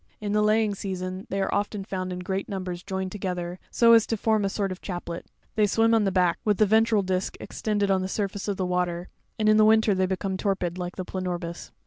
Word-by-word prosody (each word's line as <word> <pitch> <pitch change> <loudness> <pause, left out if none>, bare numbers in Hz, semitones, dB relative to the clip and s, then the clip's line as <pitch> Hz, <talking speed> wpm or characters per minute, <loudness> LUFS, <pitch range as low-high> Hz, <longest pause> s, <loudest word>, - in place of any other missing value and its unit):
In 210 -1 -3
the 210 0 +3
laying 215 0 +3
season, 185 -1 -5
they 195 - -2
are - - -2
often 205 0 -1
found 185 -1 -4
in 180 0 -4
great 190 +1 -3
numbers 185 -3 -4
joined 190 -1 -4
together, 180 -2 -4
so 230 -1 +5
as 225 -1 +6
to 225 - -1
form 220 0 +2
a 195 - +1
sort 195 -1 -2
of 185 - -7
chaplet. 175 -2 -5 0.3
'They 210 -1 +3
swim 225 +3 +3
on 220 -2 +4
the 195 - +1
back 180 -2 +2
with 210 -2 +2
the 215 - +5
ventral 220 0 +3
disk 185 0 -2
extend 210 -2 -2
ed 200 - +2
on 190 -1 +2
the 185 - -2
surface 200 0 -3
of 200 -2 -1
the 185 - -1
water, 180 -1 -1 0.3
and 215 - +1
in 215 0 +6
winter 220 -1 +5
they 190 0 +1
become 190 0 -2
torpid 185 -3 -1
like 180 0 -4
the 185 - -4
planorbis. 175 -2 -4
195 Hz, 240 wpm, -26 LUFS, 185-210 Hz, 0.3 s, as